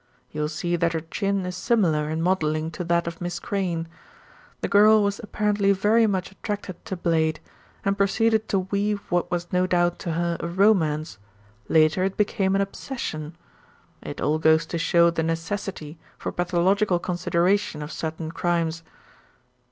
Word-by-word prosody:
You 150 - -4
will 150 - 0
see 175 +3 -2
that 170 -1 +1
her 160 - -1
chin 195 +4 -2
is 180 0 -4
similar 175 -9 +1
in 160 +1 -2
modelling 160 -3 0
to 165 - -5
that 170 0 +1
of 170 0 -6
Miss 175 0 -3
Crayne. 175 -5 -2 0.7
The - - -1
girl 215 +1 +6
was 200 0 -1
apparently 210 -2 +1
very 215 +4 +3
much 190 -3 -2
attracted 200 -2 -6
to 190 -4 -4
Blade, 160 -2 +1 0.5
and 195 0 +2
proceeded 220 +2 +2
to 195 - +2
weave 205 0 0
what 175 0 +1
was 175 0 -3
no 180 0 +2
doubt 175 -1 +1
to 170 - -3
her 170 +1 -1
a - - -3
romance, 170 - +2 0.5
later 160 +3 +4
it 195 0 -1
became 200 -2 +1
an 195 - +2
obsession. 175 - -5 0.7
It - - -7
all 155 +1 +1
goes 160 +1 +4
to 170 - 0
show 170 0 +4
the 165 - -1
necessity 165 -1 -4 0.2
for - - -4
pathological 180 +2 +1
consideration 175 -1 0
of 150 - -7
certain 160 0 -4
crimes." 165 -1 -1
175 Hz, 165 wpm, -24 LUFS, 165-200 Hz, 0.7 s, girl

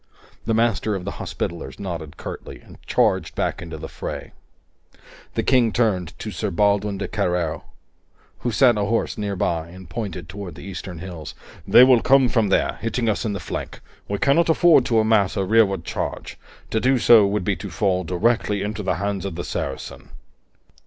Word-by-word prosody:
The 115 - +2
Master 110 -3 +1
of 90 -2 -5
the 100 - -5
Hospitallers 85 -1 -5
nodded 85 -6 -6
curtly - - -8
and - - -17
charged - - +1
back - - -1
into 85 -2 -7
the 75 - -7
fray. - - -6 1.0
The - - 0
King 125 -4 +3
turned 100 -8 0
to - - -6
Sir - - -2
Baldwin 100 +1 +1
de - - -3
Carreo, 90 -5 -1 0.7
who 120 - -2
sat 120 0 +4
ahorse 110 +3 0
nearby, 90 -5 -1
and 90 +1 -12
pointed 95 -8 -5
toward 95 -3 -8
the - - -11
eastern 95 -2 -7
hills. 85 -3 -8 0.3
"They 125 - +8
will 130 -3 +6
come 135 -2 +4
from 110 -4 +2
there, - - +1
hitting 115 +1 -1
us 110 +2 0
in 105 - -1
the 100 - -4
flank; - - -6 0.3
we 100 - -2
cannot 160 +7 +3
afford 160 -5 +5
to 115 - +1
amass 110 -3 +3
a 95 - +1
rearward 100 -4 +3
charge. - - -5 0.3
To 110 - +1
do 130 +3 +3
so 115 -3 +6
would 100 -1 -1
be 100 +1 0
to 100 - -7
fall 95 +2 0
directly 105 +3 0
into 105 +1 -3
the 95 - 0
hands 100 +2 -2
of 100 -4 -4
the 85 - -4
Saracen." - - -5
100 Hz, 180 wpm, -22 LUFS, 90-115 Hz, 1.0 s, They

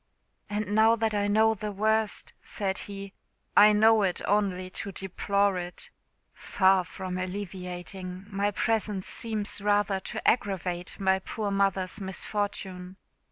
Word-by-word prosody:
"And 205 0 -2
now 220 +2 +5
that 225 -1 0
I 205 0 +1
know 220 +2 +4
the 210 0 -4
worst," 220 +1 0
said 195 -1 -2
he, 200 -1 -7 0.4
"I 210 +1 +8
know 220 +1 +5
it 185 -3 +1
only 185 -2 0
to 200 - -5
deplore 195 +1 0
it. 175 0 -8 0.4
Far 190 -1 +3
from 185 0 -5
alleviating, 185 0 -6 0.3
presence 210 -4 0
seems 215 -4 -2
rather 205 -1 +2
to - - -5
aggravate 180 -5 0
my 190 -1 +3
poor 205 +1 -4
mother's 195 -1 0
misfortune. 190 -1 -4
200 Hz, 125 wpm, -28 LUFS, 185-210 Hz, 0.4 s, I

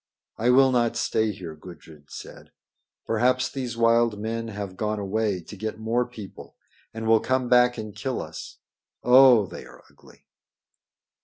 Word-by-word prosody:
"I 120 - +1
will 130 +1 +5
not 120 -2 +1
stay 110 -2 0
here," 90 -5 -8
Gudrid 75 -3 -14
said. - - -11 0.6
"Perhaps 125 +3 +1
these 125 -4 -5
wild 115 -1 +3
men 115 +1 -4
have 100 -3 -6
gone 105 +1 -2
away 100 -1 -1
to 105 - -11
get 110 +2 -5
more 115 +3 -1
people 110 -6 -11 0.4
and 115 0 -6
will 110 0 +4
come 130 0 -1
back 125 0 +4
and 110 -2 -7
kill 125 +5 -3
us. - - -8 0.5
Oh! 125 -3 +7
they - - -10
are - - -16
ugly." - - -21
115 Hz, 155 wpm, -25 LUFS, 105-125 Hz, 0.6 s, Oh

